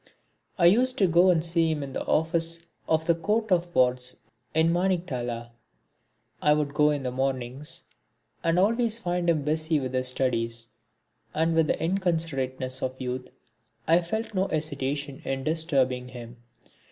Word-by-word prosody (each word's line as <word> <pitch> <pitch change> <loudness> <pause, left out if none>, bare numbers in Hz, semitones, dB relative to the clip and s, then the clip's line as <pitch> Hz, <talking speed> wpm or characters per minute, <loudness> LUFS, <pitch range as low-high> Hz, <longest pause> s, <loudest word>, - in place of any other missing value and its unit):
I 175 - +3
used 250 +8 +4
to 195 - +4
go 175 +1 +5
and 165 -3 +3
see 165 -1 +3
him 155 -2 -1
in 135 -1 -7
the - - -3
office 165 +1 +1 0.2
of 160 0 +2
the 170 - +4
Court 210 +6 -1
of 175 -1 +1
Wards 125 0 +2 0.3
in 160 +1 +3
Maniktala. 130 -11 -2 0.9
I 150 - +5
would 150 -1 -1
go 150 0 +4
in 145 -2 -1
the 125 - -2
mornings 130 +4 -2 0.6
and 165 +1 +2
always 225 +4 +2
find 175 -5 -1
him 155 -4 +2
busy 155 +1 +1
with 130 -2 -4
his 130 0 0
studies, 115 -3 -1 0.7
and 165 +1 +2
with 160 -1 +3
the - - +1
inconsiderateness 160 -8 -1
of 130 0 -3
youth, 125 0 -4 0.6
I 165 +2 +5
felt 220 +6 -3
no 190 0 +1
hesitation 145 -2 -2
in 135 0 -3
disturbing 135 -5 0
him. 120 -1 -10
155 Hz, 155 wpm, -26 LUFS, 130-170 Hz, 0.9 s, go